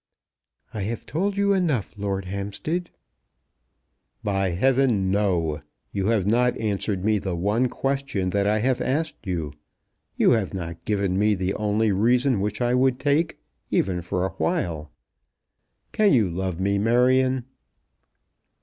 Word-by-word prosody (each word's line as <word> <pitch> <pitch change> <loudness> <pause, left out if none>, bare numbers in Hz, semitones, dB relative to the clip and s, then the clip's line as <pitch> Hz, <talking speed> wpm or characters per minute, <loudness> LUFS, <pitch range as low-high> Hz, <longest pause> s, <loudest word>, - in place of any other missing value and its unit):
"I 105 - -4
have 110 +4 -4
told 195 +7 -1
you 200 0 +3
enough, 160 - 0
Lord 100 -2 -3
Hampstead." 100 - -3 1.3
"By 95 -2 0
heavens, 130 +8 +2
no! 95 -6 0 0.3
You 95 0 -1
have 110 -5 +2
not 120 +4 +2
answered 100 -2 -2
me 110 -1 +3
the 95 -2 -3
one 105 +8 +1
question 135 -10 -2
that 100 +1 +1
I 105 +1 +2
have 130 +1 +1
asked 145 -4 -2
you. 80 -6 -3 0.6
You - - +4
have 110 -5 +1
not 85 -2 -6
given 100 -3 0
me 105 0 +3
the 95 0 -1
only 105 +1 +1
reason 120 +4 +2
which 105 +2 -2
I 120 0 +2
would 130 0 +2
take, 150 +3 +1 0.3
even 90 -2 0
for 90 +2 -2
a 95 - -3
while. 75 -3 -1 1.0
Can 210 -5 +3
you 110 -9 +3
love 90 0 -3
me, 100 +1 +1
Marion?" 125 +3 +3
105 Hz, 140 wpm, -24 LUFS, 95-125 Hz, 1.3 s, You